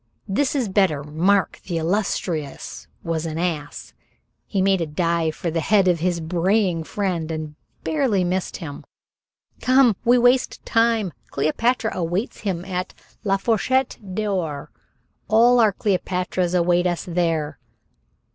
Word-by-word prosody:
This 265 +9 0
is 255 -5 +1
better. 190 -7 +2
Mark, 175 +7 +1
the 175 -3 -1
illustrious, 165 -4 -2 0.2
was 165 -1 -2
an 160 0 -4
ass." 160 -4 -3 0.5
He 200 - -1
made 190 -1 +3
a 165 - -1
dive 165 0 0
for 170 - -3
the 165 - 0
head 195 +3 +3
of 175 -2 +3
his 175 0 0
braying 175 +1 +1
friend 170 0 -2
and 155 -2 -4 0.3
barely 255 -11 +1
missed 180 +1 -2
him. 145 -6 -8 0.8
"Come. 255 -3 +5
We 240 +1 +5
waste 245 +1 +2
time. 225 -6 +2 0.2
Cleopatra 220 - 0
awaits 180 +6 -2
him 185 -4 -3
at 185 -1 -4 0.3
'la 195 -1 +2
Fourchette 240 +5 +1 0.2
d'or'; 185 -9 -2 0.6
all 235 +4 +5
our 220 -3 +5
Cleopatras 185 -2 -1
await 175 0 +3
us 175 -1 -1
there." 165 -4 -1
180 Hz, 135 wpm, -22 LUFS, 165-210 Hz, 0.8 s, Come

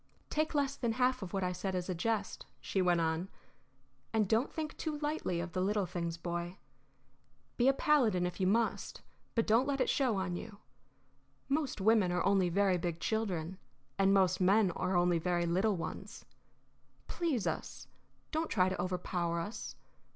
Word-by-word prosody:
"Take 310 +1 0
less 280 -1 +1
than 235 -4 -1
half 255 +1 +1
of 185 -3 -6
what 195 -1 -1
I 180 - 0
said 185 +1 -3
as 180 -1 -2
a 185 - -1
jest," 205 +3 -2
she 195 - -1
went 175 -1 +3
on. 160 +3 -1 0.8
"And 220 -3 +2
don't 225 +7 +1
think 310 -1 -4
too 310 -2 -3
lightly 295 - -2
of 170 0 -4
the 185 - -1
little 205 +1 +1
things, 170 -1 -4
Boy. 175 +2 -4 1.0
Be 245 - +2
a 270 - +6
paladin 245 -12 +3
if 180 +2 -4
you 185 - +2
must, 225 +3 0 0.3
but 230 - +2
don't 230 +5 +3
let 280 -1 0
it - - +2
show 255 -6 +1
on 190 -2 -2
you. 200 +3 -7 0.9
Most 280 -4 0
women 210 -3 +4
are 180 - 0
only 195 -2 +3
very 190 0 +2
big 170 -1 -3
children, 190 -5 -2 0.4
and 195 0 +4
most 190 -2 +3
men 195 +1 +4
are 185 +2 -1
only 175 -1 +3
very 175 0 0
little 190 +5 +2
ones. 170 - -7 0.8
Please 315 - -1
us; - - -4 0.4
don't 320 +1 -1
try 185 -3 +3
to 185 - -2
overpower 175 -2 -1
us. 205 +7 -5
195 Hz, 175 wpm, -33 LUFS, 180-230 Hz, 1.0 s, a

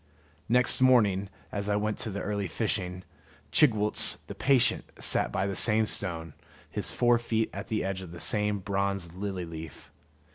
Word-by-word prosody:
Next 125 +2 +5
morning, 105 -7 +4 0.2
as 100 0 -3
I 105 - +2
went 105 +1 -1
to 115 - -1
the 100 0 -4
early 100 -2 -2
fishing, 90 -2 -2 0.5
Chigwooltz, 110 - +3
the - - -7
patient, 130 -3 +2
sat - - +2
by 95 - -1
the 100 -1 -3
same 110 +1 +3
stone, 80 -6 -2 0.4
his - - -2
fore 120 -1 +3
feet 115 -1 -1
at 100 +2 -6
the 110 -2 -1
edge 95 0 -3
of 95 - -9
the 85 - -9
same 105 +1 0
bronze 100 -3 -2
lily 95 -1 -4
leaf. 80 -2 -10
100 Hz, 170 wpm, -28 LUFS, 95-110 Hz, 0.5 s, Next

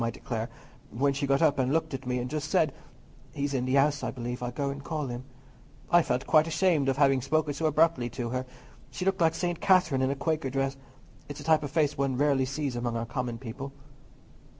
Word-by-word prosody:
I 115 - +1
declare, 115 -1 -4 0.4
when 140 +5 +1
she 140 +1 -2
got 140 +3 +3
up 145 -3 +3
and 130 0 +1
looked 160 0 0
at 135 -1 -5
me 125 0 0
and 125 0 -2
just 150 +2 -3
said, 160 -7 +2 0.6
'He's 140 -1 -2
in 125 -2 0
the 130 +1 +1
house, 145 +1 +3
I - - -2
believe: 125 0 -5
I'll 125 - -2
go 140 +3 -2
and 140 0 -7
call 155 -2 -3
him,' 120 0 -6 0.7
I 175 - +7
felt 130 -5 -1
quite 155 0 +4
ashamed 160 -4 +2
of 135 - 0
having 135 -2 +4
spoken 150 +3 0
so 160 +2 0
abruptly 155 -5 +2
to 120 0 -4
her. 130 +1 -3 0.4
She 135 +7 -5
looked 195 -1 +1
like 165 0 +3
St. 175 -1 -2
Catherine 180 -8 +4
in 130 - +2
a 140 - 0
Quaker 155 -1 -1
dress. 135 +1 -1 0.5
It's 145 - -7
a - - -8
type 160 -1 +4
of 145 - -4
face 150 -1 +1
one 135 -2 0
rarely 140 -2 +3
sees 140 -1 -3
among 120 -1 -2
our 115 - -2
common 120 -1 -3
people." 135 +3 -7
140 Hz, 230 wpm, -28 LUFS, 130-155 Hz, 0.7 s, I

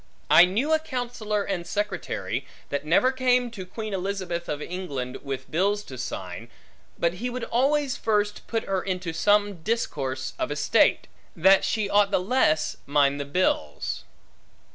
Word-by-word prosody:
I 175 - +9
knew 235 +13 0
a 315 - +4
counsellor 245 -8 -2
and 180 -4 -3
secretary, 155 - -3 0.2
that 140 0 -2
never 250 +11 +4
came 250 -2 +2
to 190 -5 -8
Queen 215 +2 -5
Elizabeth 185 -3 -3
of 150 - -2
England, 145 -8 -4
with 135 -2 -6
bills 200 +5 +1
to 130 - -9
sign, 95 -2 -6 0.5
but 170 0 +1
he 250 - -1
would 250 0 -5
always 275 +2 +1
first 205 -1 0
put 225 -1 -1
her 190 -1 -1
into 180 -3 -3
some 205 -1 +2
discourse 135 - -2
of - - -1
estate, 145 0 +3 0.3
that 190 +4 +5
she 215 -2 0
mought 205 0 +4
the 200 - +2
less 185 -6 +1
mind 140 0 +3
the 140 - -3
bills. 140 - -1
190 Hz, 155 wpm, -26 LUFS, 150-220 Hz, 0.5 s, I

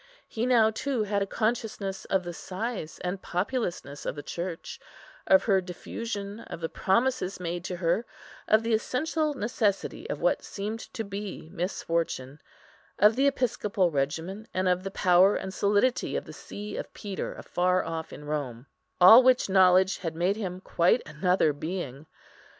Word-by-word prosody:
He 230 +2 -2
now 225 -3 +5
too 250 0 -1
had 205 -1 -1
a 200 - 0
consciousness 215 -3 -2
of 190 -1 +1
the 175 0 -5
size 190 -1 -5
and 180 +1 -3
populousness 180 - -3
of - - -3
the 145 - -7
Church, 170 -1 -5 0.5
of 285 - +6
her 195 -4 +3
diffusion, 200 +3 -6
of 200 - -8
the 165 -1 -3
promises 230 -2 0
made 175 -1 -3
to 180 - -3
her, 175 +6 0 0.4
of 215 +1 +4
the 230 0 0
essential 300 +6 0
necessity 215 -4 -1
of - - -3
what - - +2
seemed 215 +3 -5 0.2
to 225 - -2
be 200 -5 -6
misfortune, 165 -6 -2 0.6
of 210 +2 +5
the 270 +2 +3
episcopal 210 -8 +1
regimen, 165 +9 -2
and 185 0 +1
of 180 0 +2
the 195 - -3
power 185 +1 +4
and 190 - -4
solidity 205 +6 +1
of - - -2
the - - -10
see 205 0 -8
of - - -6
Peter 200 -3 -5
afar 180 +1 0
off 165 -1 -4
in 150 - -10
Rome, 140 -5 -4 0.3
all 190 +7 +10
which 255 -4 +3
knowledge 185 0 +5
had 165 -3 -4
made 180 +4 +1
him 185 -4 -5
quite 180 +6 +2
another 155 +1 +2
being. 155 -2 -5
190 Hz, 160 wpm, -28 LUFS, 175-220 Hz, 0.6 s, all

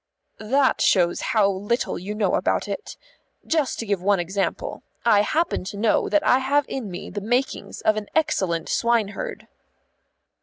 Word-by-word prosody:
"That 265 +5 +2
shows 175 -3 +3
how 220 -6 +2
little 200 +2 -1
you 200 +4 -5
know 210 -2 +1
about - - +1
it. - - -6 0.5
Just 310 -5 0
to 230 - -4
give 200 -3 -1
one 200 0 +2
example. 195 - -2 0.2
I 210 -3 +5
happen 315 - 0
to 200 - -6
know 215 +1 +2
that 305 0 +2
I 255 - +5
have 280 +2 +1
in 245 -6 -4
me 180 0 -7
the 205 - -4
makings 245 +6 -2
of 215 0 +2
an 210 -1 -4
excellent 190 - 0
swineherd." 235 - -1
215 Hz, 160 wpm, -23 LUFS, 200-265 Hz, 0.5 s, I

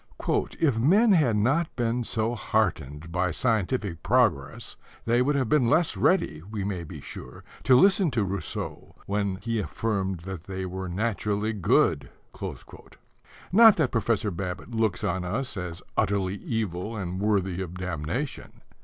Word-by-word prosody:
"If 140 -9 +2
men 200 - +5
had 150 - +4
not 135 +10 +1
been 120 0 0
so 110 +1 -1
heartened 85 - -1
by 90 +1 +1
scientific 105 -3 -1
progress 95 - +1 0.3
they 120 +2 +3
would 145 +3 +2
have 130 -4 +1
been 125 -2 +3
less 160 +3 +3
ready, 80 - +2
we 100 +3 -5
may 95 -3 -3
be 80 - -9
sure, 65 - -10 0.2
to 130 - +6
listen 195 -1 +4
to 115 -5 0
Rousseau 95 -3 -5
when 100 -1 -1
he 115 +3 -2
affirmed 95 +1 -2
that 90 -2 -7
they 95 -1 -4
were 95 0 -5
naturally 105 +2 -1
good." 100 -5 +2 1.4
Not 225 +2 +8
that 155 -6 +1
Professor 110 -2 0
Babbitt 90 +4 -5
looks 110 -4 0
on 95 -2 -1
us 115 +9 -2
as 90 -3 -6
utterly 95 -2 +1
evil 105 -1 -3
and 95 -2 -4
worthy 95 -3 0
of 90 -1 -6
damnation. 90 - -4
105 Hz, 145 wpm, -26 LUFS, 90-120 Hz, 1.4 s, Not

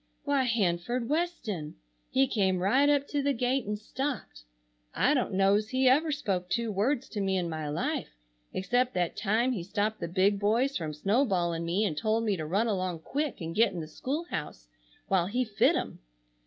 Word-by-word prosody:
Why, 280 -2 +2
Hanford 225 +2 0
Weston. 290 - -2 0.3
He 265 +1 +3
came 190 -6 +1
right 255 +11 +3
up 285 -1 +2
to 290 - 0
the 280 0 +1
gate 250 0 0
and 210 0 -1
stopped. 245 - -5 0.5
I 290 - +3
don't 255 -6 0
know's 200 +3 +3
he 260 +1 +2
ever 300 +5 +4
spoke 195 -11 -2
two 235 +1 0
words 240 +7 0
to 210 - -3
me 190 -1 +1
in 175 -2 -1
my 155 -2 -4
life 145 - -2 0.4
except 245 +5 0
that 175 -2 0
time 225 +5 +1
he 220 -8 -2
stopped 205 +4 -1
the - - -3
big 195 +3 +2
boys 235 +7 +2
from 155 -3 -3
snow 200 - +2
balling 170 -7 0
me 185 +6 +1
and 165 -7 -1
told 220 +7 0
me 210 -3 +1
to 155 -3 -4
run 200 +8 +1
along 185 -6 -2
quick 290 - -3
and 165 0 -4
git 215 0 +3
in 175 - -4
the 155 - -5
school 275 - -3
house - - -5 0.4
while 185 -3 +2
he 250 +5 0
fit 215 -3 +3
'em. - - -3
210 Hz, 195 wpm, -29 LUFS, 180-255 Hz, 0.5 s, ever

